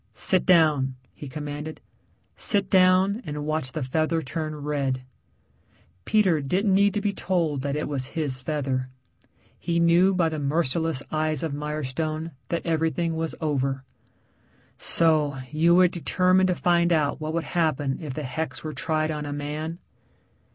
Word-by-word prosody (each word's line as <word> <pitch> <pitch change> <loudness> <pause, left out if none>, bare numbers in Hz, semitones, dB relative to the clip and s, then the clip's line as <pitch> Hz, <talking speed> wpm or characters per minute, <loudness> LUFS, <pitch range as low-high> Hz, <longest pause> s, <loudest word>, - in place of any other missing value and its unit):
"Sit 185 -2 +3
down," 150 -7 +4 0.2
he 145 - -9
commanded. 150 +2 -6 0.6
"Sit 200 -3 +1
down 185 +3 +4
and 150 0 -5
watch 155 -4 -2
the 155 - -3
feather 160 +5 0
turn 155 +2 -4
red." 140 -3 -2 1.0
Peter 190 -8 +3
didn't 190 +8 +1
need 200 +2 +3
to 210 - 0
be 205 -1 -1
told 170 -7 -1
that 140 +1 -2
it 150 - -2
was 135 -3 -3
his 140 -5 0
feather. 130 -2 -2 0.7
He 170 -1 -1
knew 175 +3 +4
by 170 -3 +2
the 155 -1 -4
merciless 155 0 0
eyes 155 -1 -1
of 160 -3 -2
Mirestone 155 +2 -3 0.2
that 170 - -2
everything 165 0 0
was 160 0 -3
over. 135 -3 -1 0.9
"So, 155 -4 +3
you 165 +3 +4
were 180 0 +6
determined 185 +1 +2
to 180 - +1
find 175 0 +2
out 150 -2 +1
what 155 +1 -3
would 170 - 0
happen 150 -6 -1
if 145 -5 -6
the 155 - -4
hex 130 +2 -4
were 155 -1 -5
tried 155 -1 -1
on 150 -1 -4
a - - -4
man?" 150 +3 -4
155 Hz, 155 wpm, -25 LUFS, 145-170 Hz, 1.0 s, were